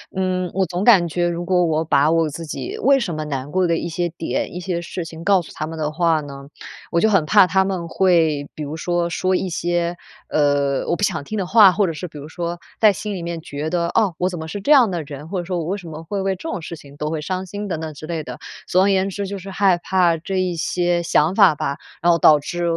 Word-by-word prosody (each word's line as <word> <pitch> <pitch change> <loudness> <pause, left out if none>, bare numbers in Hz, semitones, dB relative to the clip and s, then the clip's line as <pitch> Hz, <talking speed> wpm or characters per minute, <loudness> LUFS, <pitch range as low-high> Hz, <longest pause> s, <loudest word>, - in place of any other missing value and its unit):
嗯， 185 -1 -1
我 190 - +2
总 180 +2 -3
感 195 -7 +6
觉 175 +2 0
如 175 0 -3
果 180 0 +2
我 160 -1 0
把 150 -1 +3
我 165 0 +2
自 160 +2 -7
己 375 - -5
为 275 -6 +4
什 200 -9 -3
么 155 0 -3
难 140 -1 -4
过 185 +1 +2
的 165 -1 +1
一 170 - -3
些 175 +1 -2
点， 165 0 -3
一 - - -4
些 180 -1 -3
事 175 0 -5
情 160 +1 -9
告 195 -1 +3
诉 - - -13
他 155 - -4
们 165 0 -7
的 155 -1 -2
话 160 -1 +1
呢， 140 -1 -10 0.4
我 170 - +2
就 220 - +4
很 195 -6 +3
怕 205 +1 +6
他 190 +2 +2
们 185 -3 -3
会， 160 -6 +2
比 155 - -5
如 145 +2 -5
说 175 +1 -1
说 185 +2 0
一 190 - -1
些， 175 0 -1 0.3
呃， 145 -2 +1
我 - - +2
不 205 - -4
想 165 -7 0
听 215 +9 -5
的 195 - -1
话， 205 0 +7
或 200 +3 +1
者 165 - -2
是 180 +4 -6
比 155 - -12
如 145 +1 -8
说 170 0 -4 0.2
在 215 -2 +6
心 210 +2 -5
里 180 - -5
面 170 -1 -5
觉 150 0 -5
得， 170 0 0
哦， 210 -3 +1
我 180 +1 0
怎 175 - -6
么 160 - -6
是 205 +5 -5
这 245 - 0
样 260 -7 +7
的 175 -4 -3
人， 145 0 -9
或 185 +2 -3
者 - - -3
说 180 0 -2
我 160 - -3
为 190 +4 -2
什 180 -4 -10
么 155 0 -8
会 195 +4 -3
为 195 0 0
这 320 - -7
种 195 - -4
事 170 - -7
情 140 -1 -15
都 150 +1 -3
会 160 - -2
伤 185 +4 -3
心 205 +2 -6
等 165 -5 -3
等 160 -1 -5
之 150 +2 -10
类 165 -2 -3
的。 125 -3 -8 0.3
总 185 - +3
而 200 - +3
言 195 0 +2
之， 200 +1 -4
就 200 +1 -5
是 195 +1 -9
害 190 -2 +3
怕 175 -1 +2
这 185 +4 -3
一 180 -2 -1
些 175 +1 0
想 165 +1 +2
法 195 -7 +6
吧， 140 -1 -2 0.3
然 175 - +4
后 170 - +3
导 155 -2 +6
致 175 +4 -4
175 Hz, 300 characters per minute, -21 LUFS, 160-190 Hz, 0.4 s, 话